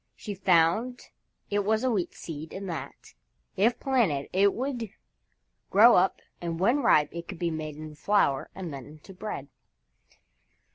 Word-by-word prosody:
She 210 - -6
found 190 +6 +2 0.4
it 205 0 +1
was 220 +3 +1
a 260 - +2
Wheat 195 -6 -1
Seed 155 -1 -8
and 195 0 -6
that, 170 -3 -7 0.4
if 225 +5 +2
planted, 210 - +1
it 195 +2 +4
would 245 -4 -3 0.8
grow 225 +5 +7
up 185 +1 +2 0.2
and 165 -1 -3
when 240 +10 +3
ripe 150 - +4
it 170 0 -7
could 190 - -7
be 170 0 -1
made 155 -1 -5
into 155 0 -9
flour 155 -5 +1
and 180 -5 -6
then 135 -3 -8
into 155 +6 -13
bread. 185 -7 -6
190 Hz, 155 wpm, -28 LUFS, 160-215 Hz, 0.8 s, grow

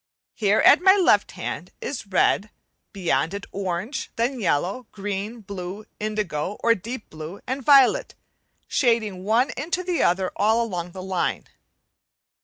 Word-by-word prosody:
Here 210 0 +2
at - - +7
my 380 +1 +7
left 335 - +3
hand 175 -1 -5
is 270 -2 -4
the 200 - -19
red, 200 +2 +2 0.4
beyond 185 -1 0
it 200 - -6
orange, 195 +5 -3
then 245 +3 -1
yellow, 195 - -1
green, 205 +3 -5
blue, 195 0 -7
indigo 210 -4 -2
or 230 - +5
deep 230 +3 -7
blue, 155 +5 -8
and 265 +2 -3
violet, 280 - +5 0.5
shading 220 -7 +1
one 230 +6 +2
into 335 +6 -2
the 355 -1 -1
other 185 +1 +2
all 220 +3 +3
along 180 -5 -4
the 185 - -7
line. 190 -1 -1
210 Hz, 145 wpm, -24 LUFS, 185-240 Hz, 0.5 s, at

